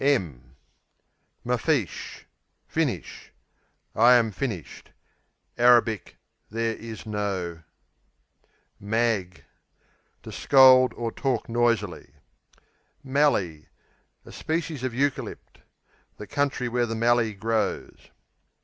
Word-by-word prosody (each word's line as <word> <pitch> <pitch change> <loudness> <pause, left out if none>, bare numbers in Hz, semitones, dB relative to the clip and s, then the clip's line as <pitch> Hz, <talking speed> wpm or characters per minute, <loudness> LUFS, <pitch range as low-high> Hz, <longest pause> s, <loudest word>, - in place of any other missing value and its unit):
Mafeesh 125 - -2 0.4
Finish; - - -3 0.6
I 120 +3 +6
am 115 -3 +3
finished. 105 - -6 0.7
[Arabic 120 -4 +3 0.3
"there 115 +1 -2
is 115 -1 -9
no.."] 95 -6 -3 1.2
Mag 105 -4 -1 0.8
To - - -9
scold 130 -2 +6
or 115 -1 -3
talk 130 -3 -2
noisily. 115 -11 -1 0.9
Mallee 130 - 0 0.6
A - - -12
species 160 -4 -3
of 130 - -1
Eucalypt; 140 +1 -3 0.6
the 105 - -8
country 140 0 -1
where 120 0 0
the 115 - -3
Mallee 115 -1 +2
grows. 110 +2 -3
115 Hz, 85 wpm, -25 LUFS, 105-130 Hz, 1.2 s, I